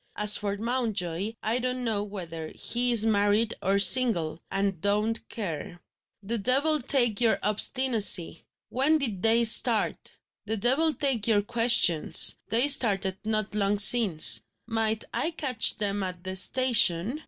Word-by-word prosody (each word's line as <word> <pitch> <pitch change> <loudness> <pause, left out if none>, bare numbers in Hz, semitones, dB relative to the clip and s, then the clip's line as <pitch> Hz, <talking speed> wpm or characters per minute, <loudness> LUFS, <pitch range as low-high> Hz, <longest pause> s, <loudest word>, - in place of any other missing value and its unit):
"As 210 0 +2
for 205 -1 -5
Mountjoy, 215 -4 -5
I 225 +3 -1
don't 255 0 -5
know 220 -4 -4
whether 170 -6 -10
he 245 +1 -1
is 225 -2 +4
married 210 +1 -1
or 195 +1 -1
single 200 -8 +3
and 195 -3 -4
don't 210 +3 -3
care." 175 -4 -8 0.4
"The 230 +3 -4
devil 275 +8 +1
take 240 -4 +1
your 230 -2 0
obstinacy! 210 -5 -1 0.3
When 275 +5 0
did 225 -11 -4
they 230 +2 +2
start?" 230 0 +3 0.3
"The 220 +1 -3
devil 265 +9 0
take 270 -8 -2
your 210 -3 0
questions! 230 -8 +3
They 235 +6 +1
started 195 -8 0
not 215 -1 -3
long 205 -1 0
since." 210 -6 +5 0.2
"Might 225 -1 -2
I 325 - -1
catch 275 -8 +1
them 205 -1 -2
at 180 -2 -5
the 185 0 -7
station?" 230 - +1
220 Hz, 140 wpm, -24 LUFS, 200-245 Hz, 0.4 s, since